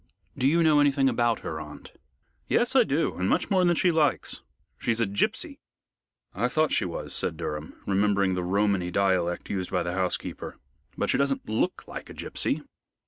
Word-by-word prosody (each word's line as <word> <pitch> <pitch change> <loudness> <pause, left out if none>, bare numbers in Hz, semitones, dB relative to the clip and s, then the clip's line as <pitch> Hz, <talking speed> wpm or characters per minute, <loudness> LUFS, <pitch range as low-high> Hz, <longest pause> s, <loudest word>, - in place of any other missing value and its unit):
"Do 130 - +1
you 165 +4 +4
know 155 -2 +5
anything 140 -2 +3
about 120 -2 +1
her, 80 -1 -4
aunt?" 75 -1 -10 0.6
"Yes, 245 +2 +1
I 260 - +7
do, 160 -5 0
and 95 +1 0
much - - 0
more 185 -2 +4
than 175 -1 +3
she 180 +2 +3
likes. 155 -3 0 0.4
She's 115 -1 0
a 115 - +3
gipsy." 100 0 -1 0.7
"I 110 +6 0
thought 155 +4 +1
she - - +1
was," 85 - -5
said - - -1
Durham, 75 +1 -5
remembering 100 -1 +2
the 90 - -1
Romany 100 -1 +1
dialect 90 -2 0
used 95 -2 -2
by 90 -2 0
the 85 - -3
housekeeper, 95 -1 -3 0.4
"but - - +1
she - - +1
doesn't 140 -1 0
look 110 +1 -1
like - - -8
a - - -10
gipsy." - - -1
105 Hz, 185 wpm, -27 LUFS, 90-145 Hz, 0.7 s, I